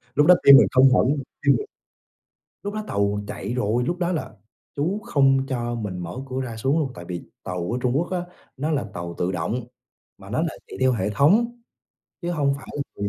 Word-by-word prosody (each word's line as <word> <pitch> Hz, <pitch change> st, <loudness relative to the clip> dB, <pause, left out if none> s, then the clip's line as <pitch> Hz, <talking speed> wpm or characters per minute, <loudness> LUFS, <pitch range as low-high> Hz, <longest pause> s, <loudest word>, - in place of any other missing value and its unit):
Lúc 150 Hz, -, +5 dB
đó 180 Hz, -, +9 dB
tim 140 Hz, -, +10 dB
mình -, -, +6 dB
không 130 Hz, 0 st, +6 dB
hỏi 125 Hz, -, +4 dB
luôn, 140 Hz, -1 st, 0 dB, 0.2 s
tim -, -, +6 dB
mình 420 Hz, -, -5 dB, 1.0 s
lúc 205 Hz, 0 st, -4 dB
đó 215 Hz, 0 st, -3 dB
tàu 100 Hz, 0 st, 0 dB
chạy 100 Hz, +2 st, -5 dB
rồi, 120 Hz, 0 st, 0 dB
lúc 175 Hz, +8 st, -1 dB
đó 175 Hz, 0 st, 0 dB
là 165 Hz, -, -3 dB, 0.4 s
chú 175 Hz, +9 st, -1 dB
không 135 Hz, -, +3 dB
cho 120 Hz, -3 st, -2 dB
mình 105 Hz, -5 st, -4 dB
mở 85 Hz, +5 st, -6 dB
cửa 130 Hz, +1 st, -2 dB
ra, 120 Hz, -3 st, -5 dB
xuống 135 Hz, +8 st, +1 dB
luôn 140 Hz, -4 st, -1 dB
tại 85 Hz, -, -9 dB
vì 90 Hz, -1 st, -4 dB, 0.2 s
tàu 90 Hz, +1 st, -3 dB
ở 120 Hz, -, -1 dB
Trung 125 Hz, -, +1 dB
Quốc 175 Hz, +5 st, -1 dB
á, 185 Hz, -, 0 dB, 0.4 s
nó 150 Hz, +4 st, -1 dB
là 145 Hz, -6 st, 0 dB
tàu 85 Hz, -2 st, -6 dB
tự 90 Hz, +1 st, 0 dB
động 90 Hz, +8 st, -2 dB, 0.6 s
mà -, -, -13 dB
nó -, -, 0 dB
lại -, -, -2 dB
chạy -, -, -9 dB
theo 130 Hz, 0 st, +4 dB
hệ 105 Hz, -5 st, -1 dB
thống 220 Hz, -, +3 dB, 0.6 s
chứ 170 Hz, -, -2 dB
hông 145 Hz, -5 st, +1 dB
phải 140 Hz, -, -12 dB, 0.3 s
là 100 Hz, 0 st, -2 dB
130 Hz, 225 wpm, -23 LUFS, 105-150 Hz, 1.0 s, tim